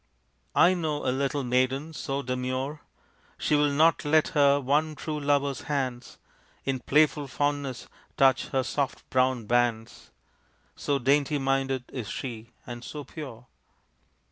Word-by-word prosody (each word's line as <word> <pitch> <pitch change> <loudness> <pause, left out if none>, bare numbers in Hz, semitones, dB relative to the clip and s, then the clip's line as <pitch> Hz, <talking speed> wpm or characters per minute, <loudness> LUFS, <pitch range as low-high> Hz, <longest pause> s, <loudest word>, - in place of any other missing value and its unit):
(I 180 - +6
know 155 -4 -2
a 130 - +2
little 140 +1 -1
maiden 130 +5 0
so 140 -2 -3
demure 130 +3 -3 0.6
She - - -1
will 145 0 +4
not 155 +3 +3
let 155 +1 +3
her 140 -2 +4
one 150 +3 +1
true 150 0 -4
lover's 140 -1 +1
hands 130 -4 -3 0.5
In 135 -1 -1
playful 150 +2 +2
fondness 145 -1 -2 0.3
touch 135 -1 +4
her 130 -1 0
soft 135 +1 -3
brown 130 -2 +2
bands, 120 0 0 0.7
So 145 - 0
dainty 140 +3 +2
minded 135 -1 0
is 120 -6 -5
she, 115 -3 -6 0.2
and 120 -1 -7
so 150 +3 -7
pure.) 130 -5 -9
135 Hz, 135 wpm, -27 LUFS, 130-145 Hz, 0.7 s, I